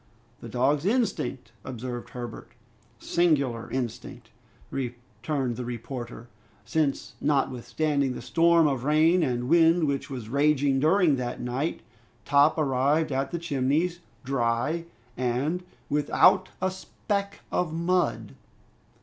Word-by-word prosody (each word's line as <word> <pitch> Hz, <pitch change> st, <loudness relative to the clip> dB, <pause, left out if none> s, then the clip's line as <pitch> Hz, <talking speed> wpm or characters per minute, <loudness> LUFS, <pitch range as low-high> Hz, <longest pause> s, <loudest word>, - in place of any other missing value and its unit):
"The 115 Hz, -, -9 dB
dog's 135 Hz, +5 st, +1 dB
instinct 210 Hz, -, -1 dB
" 100 Hz, -, -34 dB
observed 125 Hz, -1 st, -6 dB
Herbert. 120 Hz, -2 st, -8 dB, 0.4 s
"Singular 140 Hz, -9 st, +1 dB
instinct!" 125 Hz, -4 st, -5 dB, 0.4 s
returned 120 Hz, 0 st, -3 dB
the 125 Hz, -, -3 dB
reporter, 120 Hz, 0 st, -6 dB, 0.4 s
"since 145 Hz, +3 st, -1 dB
notwithstanding 140 Hz, 0 st, 0 dB
the -, -, -6 dB
storm 165 Hz, +5 st, +4 dB
of 135 Hz, -4 st, 0 dB
rain 155 Hz, +5 st, +4 dB
and 125 Hz, -4 st, -1 dB
wind 165 Hz, +2 st, +5 dB
which 140 Hz, -2 st, -1 dB
was 125 Hz, -5 st, -6 dB
raging 140 Hz, +1 st, +2 dB
during 160 Hz, -1 st, +4 dB
that 125 Hz, -1 st, -4 dB
night, 125 Hz, +6 st, -2 dB, 0.4 s
Top 145 Hz, +3 st, +4 dB
arrived 145 Hz, +2 st, +1 dB
at 135 Hz, +1 st, -1 dB
the 170 Hz, -, -3 dB
Chimneys, 165 Hz, +2 st, 0 dB, 0.2 s
dry 135 Hz, +5 st, 0 dB, 0.3 s
and 130 Hz, +8 st, -1 dB, 0.3 s
without 150 Hz, +5 st, +3 dB
a 190 Hz, -, +2 dB
speck 200 Hz, +2 st, -4 dB
of 180 Hz, -3 st, 0 dB
mud!" 175 Hz, +2 st, 0 dB
140 Hz, 115 wpm, -27 LUFS, 125-165 Hz, 0.4 s, wind